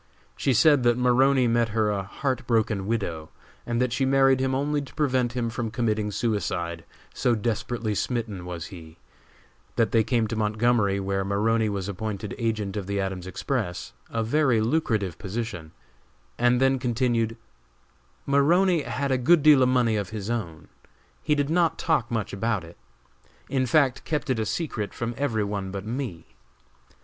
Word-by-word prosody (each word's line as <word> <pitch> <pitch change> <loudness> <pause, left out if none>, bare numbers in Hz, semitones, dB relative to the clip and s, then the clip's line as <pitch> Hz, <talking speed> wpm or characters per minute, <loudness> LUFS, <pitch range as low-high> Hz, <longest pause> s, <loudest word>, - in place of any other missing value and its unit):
She 135 - 0
said 145 +2 +5
that 120 0 +3
Maroney 130 +1 +4
met 115 0 +2
her 105 -1 +1
a 100 -1 -1
heart 130 +5 -3
broken 110 -4 +1
widow, 85 -9 -2 0.4
and 120 0 0
that 125 -1 +1
she 135 - 0
married 135 0 +4
him 130 0 0
only 145 +2 0
to 140 - -11
prevent 130 -5 +1
him 120 -2 -2
from 115 0 -3
committing 110 -2 -1
suicide, 90 -6 -2 0.3
so 120 -2 +1
desperately 115 0 -2
smitten 110 -4 -2
was 90 -2 -6
he; 80 -2 -11 0.8
that 115 - +2
they 115 -1 +4
came 115 0 +1
to 115 - -2
Montgomery, 105 -1 +1
where 95 0 -1
Maroney 110 +3 +1
was 100 -2 -3
appointed 100 0 -4
agent 110 -4 -2
of 100 -3 -4
the 100 0 -1
Adams 95 -2 -3
Express 90 -1 -3 0.2
a 115 -1 -1
very 130 0 +2
lucrative 110 - 0
position 95 -6 -5 0.6
and 120 +1 +3
then 135 0 +3
continued: 120 -2 0 0.9
"Maroney 165 +5 +3
had 140 0 -2
a 130 - +2
good 155 +5 +4
deal 150 -3 +7
of 125 - +4
money 120 -4 +2
of 100 -3 -3
his 110 0 -4
own, 85 -10 -4 0.6
but 150 -1 +3
did 145 +1 0
not 170 -1 +2
talk 150 -8 0
much 110 -4 -2
about 105 -1 -1
it, 85 +1 -12 0.7
in 130 -1 0
fact 135 -3 +2
kept 150 -3 -2
it 120 - 0
a 110 - -1
secret 120 -11 -3
from 120 0 -3
every 115 -5 0
one 100 -1 -3
but 100 +1 -6
me. 115 -7 -4
115 Hz, 170 wpm, -25 LUFS, 100-130 Hz, 0.9 s, deal